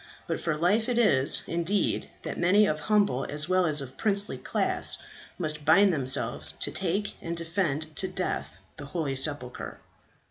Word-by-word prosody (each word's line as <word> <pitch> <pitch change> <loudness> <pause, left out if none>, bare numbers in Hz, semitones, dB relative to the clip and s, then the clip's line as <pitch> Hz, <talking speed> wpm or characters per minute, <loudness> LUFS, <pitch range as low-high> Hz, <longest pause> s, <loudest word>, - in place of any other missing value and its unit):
But - - -3
for 155 - -2
life 205 +8 +1
it 245 - -1
is, 145 - +5
indeed, 170 +4 -1
that - - -5
many 200 +5 +4
of 155 -5 -1
humble 200 -8 +1
as 150 +2 -2
well 185 -1 +2
as 150 -2 +2
of 135 -1 -10
princely 205 -1 -1
class - - -1 0.4
must 155 -3 -2
bind 180 +5 +4
themselves 130 - +2
to - - -2
take 195 +3 -2
and 170 0 -5
defend 165 -3 -3
to 190 - +1
death 185 - -4 0.2
the 145 - -8
holy 145 -2 -3
sepulchre." 135 -2 +1
165 Hz, 165 wpm, -27 LUFS, 145-195 Hz, 0.4 s, is